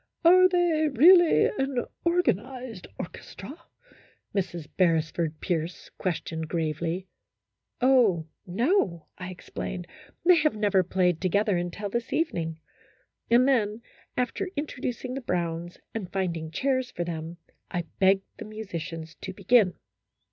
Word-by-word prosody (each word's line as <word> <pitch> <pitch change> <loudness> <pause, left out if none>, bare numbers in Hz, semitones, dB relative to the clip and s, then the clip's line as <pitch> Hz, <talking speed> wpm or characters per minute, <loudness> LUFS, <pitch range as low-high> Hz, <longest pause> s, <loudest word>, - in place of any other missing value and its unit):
" - - -24
Are 370 +2 +8
they 345 -4 +2
really 340 +6 +7
an 270 -3 0 0.2
organized 255 - -1
orchestra? 195 - -8 0.4
" - - -28
Mrs. 175 -5 -2
Beresford 165 -2 +1
Pierce 170 -1 -3
questioned, 160 -3 -3
gravely. 165 +3 -2 0.4
" - - -52
Oh, 240 -11 +4 0.2
no," 190 - +1
I 185 0 -5
explained, 180 0 -6 0.2
" - - -28
they 360 0 +7
have 305 -5 +2
never 205 -3 +3
played 180 -1 +1
together 200 +2 +2
until 175 +4 -3
this 235 +1 -2
evening," 165 - -1 0.7
and 240 +3 +5
then, 225 -4 +1 0.3
after 255 +10 -1
intro 290 -3 -4
ducing 250 0 -3
the 270 - -4
Browns, 175 -5 -2 0.2
and 200 -6 -5
finding 170 -4 -2
chairs 260 - 0
for 175 - -3
them, 165 0 -5 0.3
I 175 -2 -2 0.2
begged 195 0 +4
the - - -6
musicians 175 -6 -6
to 190 - -5
begin. 200 0 +4
195 Hz, 135 wpm, -27 LUFS, 175-255 Hz, 0.7 s, Are